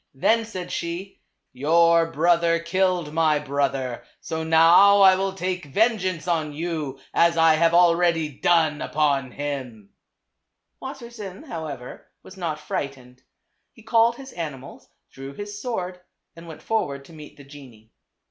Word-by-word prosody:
Then 225 Hz, +11 st, +2 dB
said 185 Hz, -5 st, -7 dB
she 175 Hz, +3 st, -5 dB, 0.3 s
"Your 165 Hz, +4 st, +3 dB
brother 170 Hz, +1 st, +2 dB
killed 175 Hz, -2 st, -1 dB
my 160 Hz, -2 st, +2 dB
brother, 135 Hz, -3 st, -2 dB, 0.2 s
so 160 Hz, 0 st, -5 dB
now 165 Hz, +5 st, +6 dB
I 190 Hz, -1 st, +7 dB
will 195 Hz, 0 st, -2 dB
take 180 Hz, -2 st, -4 dB
vengeance 185 Hz, -, 0 dB
on 160 Hz, -4 st, -1 dB
you, 155 Hz, -4 st, -4 dB
as 170 Hz, 0 st, +3 dB
I 165 Hz, -1 st, +5 dB
have 165 Hz, +1 st, +2 dB
already 170 Hz, -2 st, +3 dB
done 155 Hz, +1 st, +1 dB
upon 140 Hz, -4 st, 0 dB
him." 125 Hz, -7 st, -6 dB, 0.9 s
Wassersein, 235 Hz, -6 st, -9 dB
however, 155 Hz, -, -8 dB, 0.2 s
was 190 Hz, -, -13 dB
not 165 Hz, -5 st, -4 dB
frightened. 130 Hz, -4 st, -6 dB, 0.5 s
He 225 Hz, -, -18 dB
called 230 Hz, +1 st, +3 dB
his 270 Hz, +1 st, -11 dB
animals, 140 Hz, -5 st, -8 dB, 0.2 s
drew 135 Hz, +1 st, -9 dB
his 205 Hz, 0 st, -7 dB
sword 185 Hz, -7 st, -4 dB, 0.4 s
and 165 Hz, 0 st, -12 dB
went 160 Hz, -, -11 dB
for 225 Hz, -1 st, 0 dB
ward 140 Hz, -1 st, -8 dB
to 165 Hz, -, -16 dB
meet 150 Hz, -2 st, -13 dB
the 140 Hz, -, -13 dB
genie. 130 Hz, -6 st, -15 dB
165 Hz, 140 wpm, -23 LUFS, 145-185 Hz, 0.9 s, I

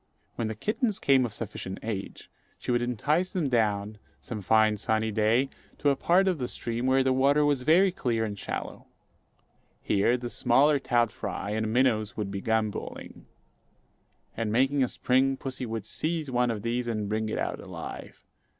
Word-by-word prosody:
When 115 Hz, -, -2 dB
the 110 Hz, -, -4 dB
kittens 215 Hz, -, -1 dB
came 135 Hz, -3 st, +3 dB
of -, -, -11 dB
sufficient 100 Hz, -3 st, -5 dB
age, 105 Hz, -3 st, -5 dB, 0.3 s
she -, -, -4 dB
would 120 Hz, 0 st, +2 dB
entice 150 Hz, -, 0 dB
them 175 Hz, -8 st, -1 dB
down, 105 Hz, -3 st, 0 dB, 0.2 s
some 110 Hz, -3 st, -6 dB
fine 110 Hz, +2 st, +3 dB
sunny 110 Hz, +1 st, 0 dB
day 110 Hz, +5 st, +2 dB, 0.3 s
to 145 Hz, -, +2 dB
a 140 Hz, -, +3 dB
part 180 Hz, +7 st, +3 dB
of 180 Hz, -5 st, +1 dB
the 125 Hz, -, -2 dB
stream, 120 Hz, +2 st, -3 dB
where 135 Hz, 0 st, +4 dB
the 130 Hz, 0 st, +2 dB
water 140 Hz, +3 st, +3 dB
was 145 Hz, -3 st, +2 dB
very 175 Hz, +8 st, +4 dB
clear 120 Hz, -10 st, -1 dB
and 105 Hz, -2 st, -3 dB
shallow. -, -, -6 dB, 1.0 s
Here 105 Hz, +5 st, +2 dB
the 120 Hz, -1 st, -6 dB
smaller 140 Hz, +4 st, +3 dB
trout 120 Hz, -4 st, +1 dB
fry 100 Hz, -, -5 dB
and 110 Hz, 0 st, -1 dB
minnows 110 Hz, -4 st, +1 dB
would 105 Hz, -2 st, -3 dB
be 100 Hz, 0 st, -4 dB
gambolling; 110 Hz, -2 st, -3 dB, 1.1 s
and, 110 Hz, -2 st, -2 dB
making 135 Hz, +4 st, +2 dB
a -, -, +2 dB
spring, 130 Hz, +2 st, +1 dB
pussy 130 Hz, -2 st, -5 dB
would 110 Hz, -2 st, -4 dB
seize 155 Hz, +1 st, -2 dB
one 125 Hz, 0 st, +2 dB
of 105 Hz, -3 st, -3 dB
these 120 Hz, +1 st, -1 dB
and 110 Hz, -3 st, -2 dB
bring 110 Hz, +1 st, -1 dB
it -, -, -2 dB
out -, -, -2 dB
alive. -, -, -9 dB
120 Hz, 175 wpm, -28 LUFS, 110-135 Hz, 1.1 s, where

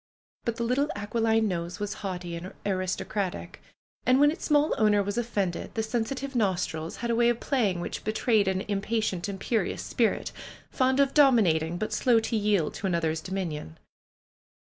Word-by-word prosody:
But 235 Hz, -, -1 dB
the 235 Hz, -, -3 dB
little 260 Hz, +5 st, +1 dB
aquiline 225 Hz, +2 st, +1 dB
nose 175 Hz, -1 st, -3 dB
was 205 Hz, 0 st, -2 dB
haughty 180 Hz, -3 st, -4 dB
and 175 Hz, +3 st, -7 dB
aristocratic, 185 Hz, 0 st, -2 dB, 0.4 s
and 255 Hz, +1 st, +4 dB
when 290 Hz, +1 st, +6 dB
its 330 Hz, -, -7 dB
small 295 Hz, 0 st, +3 dB
owner 210 Hz, -2 st, +4 dB
was 205 Hz, +1 st, -3 dB
offended, 205 Hz, -7 st, -2 dB
the 220 Hz, -, 0 dB
sensitive 255 Hz, +4 st, -3 dB
nostrils 180 Hz, -7 st, -1 dB
had 235 Hz, -, 0 dB
a -, -, +2 dB
way 235 Hz, 0 st, +4 dB
of 240 Hz, -1 st, 0 dB
playing 215 Hz, -10 st, 0 dB
which 175 Hz, -, -5 dB
betray 220 Hz, +1 st, +2 dB
e -, -, +3 dB
d -, -, +1 dB
an 190 Hz, 0 st, -1 dB
impatient, 205 Hz, -2 st, -1 dB
imperioiis 200 Hz, +1 st, -1 dB
spirit, 230 Hz, -3 st, 0 dB, 0.4 s
fond 260 Hz, 0 st, +2 dB
of 275 Hz, -1 st, +3 dB
dominating, 180 Hz, -, +4 dB
but 215 Hz, +3 st, -3 dB
slow 240 Hz, -3 st, +4 dB
to 225 Hz, +1 st, -2 dB
yield 205 Hz, -6 st, +1 dB
to 200 Hz, -, -3 dB
another's 165 Hz, -3 st, 0 dB
dominion. 165 Hz, -, -4 dB
210 Hz, 170 wpm, -27 LUFS, 185-235 Hz, 0.4 s, when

